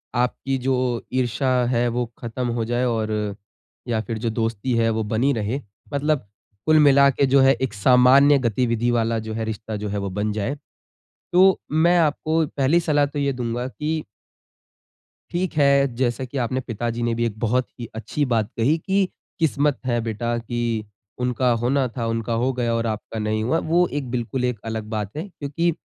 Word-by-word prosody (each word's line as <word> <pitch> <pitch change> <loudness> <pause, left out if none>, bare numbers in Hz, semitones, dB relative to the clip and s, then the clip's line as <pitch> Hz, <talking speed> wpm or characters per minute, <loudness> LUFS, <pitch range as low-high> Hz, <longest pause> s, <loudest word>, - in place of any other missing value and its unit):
आपकी 125 +2 0
जो 130 +1 0 0.4
ईर्षा 130 +1 0 0.2
है 120 -1 +2
वो 125 - 0
खत्म 120 +1 -4
हो 115 - 0
जाए 120 +2 0
और 110 -2 -1 0.8
या 115 -2 0
फिर 110 +1 -4
जो 115 +1 -2
दोस्ती 115 +2 -1
है 115 0 +3
वो 110 0 0
बनी 115 +6 +1
रहे। 115 +6 -2 0.3
मतलब 140 -5 0 0.4
कुल 155 0 +5
मिलाके 140 -1 +5
जो 135 +1 +4
है 135 0 +6
एक 130 -4 -1
सामान्य 130 +6 +6
गतिविधि 120 0 +1
वाला 115 -1 +1
जो 110 - -4
है 110 0 -3
रिश्ता 110 0 -5
जो 105 0 -4
है 100 - -2
वो 100 -1 -2
बन 105 +3 -2
जाए। 110 +7 -2 0.8
तो 190 +1 +5
मैं 170 +3 +4
आपको 160 0 +1
पहली 145 +5 +3
सलाह 145 -3 +2
तो 145 +1 -6
ये 140 -1 +1
दूँगा 120 0 -3
कि 155 +3 -3 1.3
ठीक 180 +1 -1
है, 140 -1 +5
जैसा 120 0 0
कि 135 +2 -7
आपने 130 +1 0
पिताजी 120 0 -3
ने 120 0 +1
भी 120 +1 0
एक 110 -2 -3
बहुत 125 +2 +1
ही 120 - -4
अच्छी 145 +6 -2
बात 110 -2 +1
कही 135 +8 +3
कि 195 +4 +1 0.3
किस्मत 150 -3 +1
है 120 -2 +1
बेटा 115 +1 -2
की 120 +1 -4 0.6
उनका 125 0 +1
होना 130 +2 +1
था, 115 0 -4
उनका 115 0 -2
हो 130 - +2
गया 120 -2 -1
और 115 0 -1
आपका 110 +1 -4
नहीं 110 0 -1
हुआ 155 +8 +1
वो 175 +1 +4
एक 135 -4 -4
बिल्कुल 125 +1 -2
एक 125 -4 -2
अलग 110 -1 -3
बात 105 -2 -3
है। 165 +6 -4
क्योंकि 165 +1 -1
125 Hz, 185 wpm, -23 LUFS, 115-140 Hz, 1.3 s, है